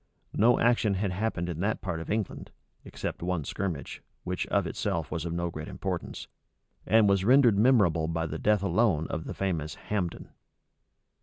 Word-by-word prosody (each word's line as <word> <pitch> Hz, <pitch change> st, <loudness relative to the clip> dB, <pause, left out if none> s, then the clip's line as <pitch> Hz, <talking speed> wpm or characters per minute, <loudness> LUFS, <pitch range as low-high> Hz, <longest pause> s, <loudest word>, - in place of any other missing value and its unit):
No 120 Hz, +3 st, +4 dB
action 115 Hz, -4 st, +3 dB
had 95 Hz, 0 st, -1 dB
happened 95 Hz, -2 st, -2 dB
in 85 Hz, -2 st, -4 dB
that 105 Hz, +4 st, 0 dB
part 90 Hz, -4 st, -3 dB
of -, -, -8 dB
England, 105 Hz, -1 st, -3 dB, 0.3 s
except -, -, -5 dB
one 90 Hz, -2 st, -1 dB
skirmish, 85 Hz, -2 st, -4 dB, 0.2 s
which -, -, -3 dB
of -, -, +1 dB
itself 80 Hz, -2 st, -2 dB
was 85 Hz, 0 st, -3 dB
of 85 Hz, -, -3 dB
no 85 Hz, 0 st, -2 dB
great 80 Hz, 0 st, -7 dB
consequence, 95 Hz, -3 st, -5 dB, 0.6 s
and 110 Hz, -1 st, +5 dB
was 100 Hz, -1 st, +3 dB
rendered 120 Hz, -2 st, +5 dB
memorable 100 Hz, -10 st, +4 dB
by 80 Hz, 0 st, -1 dB
the 80 Hz, 0 st, -5 dB
death 105 Hz, -2 st, +2 dB
alone 90 Hz, -4 st, +2 dB
of 80 Hz, -, -4 dB
the -, -, -6 dB
famous 80 Hz, -7 st, -2 dB
Hambden. 90 Hz, -5 st, -4 dB
90 Hz, 170 wpm, -28 LUFS, 85-105 Hz, 0.6 s, and